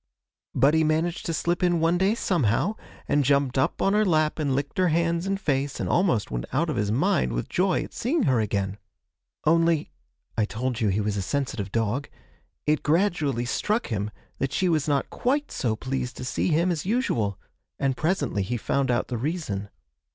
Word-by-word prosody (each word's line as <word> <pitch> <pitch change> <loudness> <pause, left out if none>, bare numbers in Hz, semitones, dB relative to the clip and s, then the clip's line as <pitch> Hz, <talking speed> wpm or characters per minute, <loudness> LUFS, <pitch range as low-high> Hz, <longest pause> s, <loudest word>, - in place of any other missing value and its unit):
But 140 +4 +4
he 160 0 +4
managed 160 +3 0
to 165 - -1
slip 170 +3 0
in 175 -2 +3
one 165 +2 +2
day 195 +4 +3
somehow, 170 - +1 0.3
and 145 0 +3
jumped 140 -1 +2
up 130 - +1
on 195 - +3
her 210 +1 +4
lap 155 -5 +2
and 140 -4 +1
licked 140 +5 -3
her 185 - +4
hands 170 +2 +1
and 195 0 0
face, 140 -5 -1
and - - -1
almost 170 - +1
went - - -2
out 155 +5 +1
of - - -3
his 105 -1 0
mind 65 - +1
with - - -2
joy 185 -1 +1
at - - -11
seeing 280 +5 0
her 130 -3 +3
again. 100 -1 -1 0.7
Only 165 0 +3 0.4
(I 110 - +2
told 120 +4 -3
you 110 - +3
he 100 +2 +1
was 105 0 -1
a - - 0
sensitive 120 -3 -2
dog) 115 +6 -1 0.6
it 150 0 +2
gradually 155 - +1
struck 210 - -1
him 105 -2 -2 0.3
that 135 -1 -1
she 185 - +1
was 155 -4 +1
not 140 -3 0
quite 285 +4 0
so 115 -3 -1
pleased 130 +2 -4
to 125 - -5
see - - -1
him 170 +2 +2
as 160 -4 -2
usual 150 - 0 0.4
and 135 -1 0
presently 145 - 0
he 120 +6 -2
found 135 +4 0
out 120 0 +1
the 120 -3 -3
reason. 125 - -3
145 Hz, 195 wpm, -26 LUFS, 120-170 Hz, 0.7 s, But